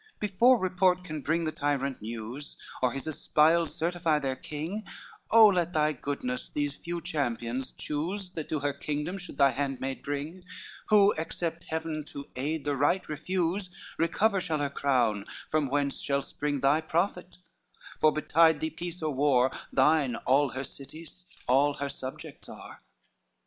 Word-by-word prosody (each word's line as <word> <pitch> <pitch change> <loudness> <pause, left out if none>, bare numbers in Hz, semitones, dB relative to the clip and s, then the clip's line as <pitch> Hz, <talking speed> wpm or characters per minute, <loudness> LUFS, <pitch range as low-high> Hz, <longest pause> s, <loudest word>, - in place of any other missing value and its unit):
LXVIII - - -40
"Before 230 +5 +4
report 185 -1 +2
can 155 -4 -5
bring 165 +4 0
the 155 - -1
tyrant 140 -3 -1
news, 115 +6 -7 0.2
Or 125 - +3
his 135 -1 -5
espials 160 +2 +2
certify 170 -1 +1
their 135 -3 -1
king, 160 +10 -5 0.5
Oh 225 0 +8
let 175 -2 0
thy 155 0 +2
goodness 250 - -4
these 145 -1 -2
few 170 +1 -5
champions 130 -6 -2
choose, 180 +6 -4
That 160 -4 -6
to 155 -2 -1
her 145 0 0
kingdom 150 +6 -3
should 180 - -9
thy 140 -1 +5
handmaid 135 0 -3
bring; 145 +6 -4 0.4
Who, 205 -1 +6
except 165 +1 -4
Heaven 160 -1 -3
to 140 -1 -8
aid 145 +4 -2
the 145 -1 0
right 145 +7 +1
refuse, 180 +4 -1 0.3
Recover 195 +4 +2
shall 160 -4 -1
her 145 -1 -1
crown, 120 -8 +1 0.2
from 155 -2 +2
whence 140 +1 0
shall 140 0 0
spring 145 -1 -3
Thy 140 +3 +4
profit; 180 +3 -1 0.6
for 155 - +5
betide 160 +1 +4
thee 160 - -2
peace 170 +1 -6
or 155 -2 0
war, 130 -2 +3 0.2
Thine 135 -2 +3
all 135 +4 +2
her 130 +2 -4
cities, 160 +7 -11 0.2
all 140 +3 +4
her 140 0 -3
subjects 130 -1 -8
are." - - -11
150 Hz, 160 wpm, -29 LUFS, 140-170 Hz, 0.6 s, Oh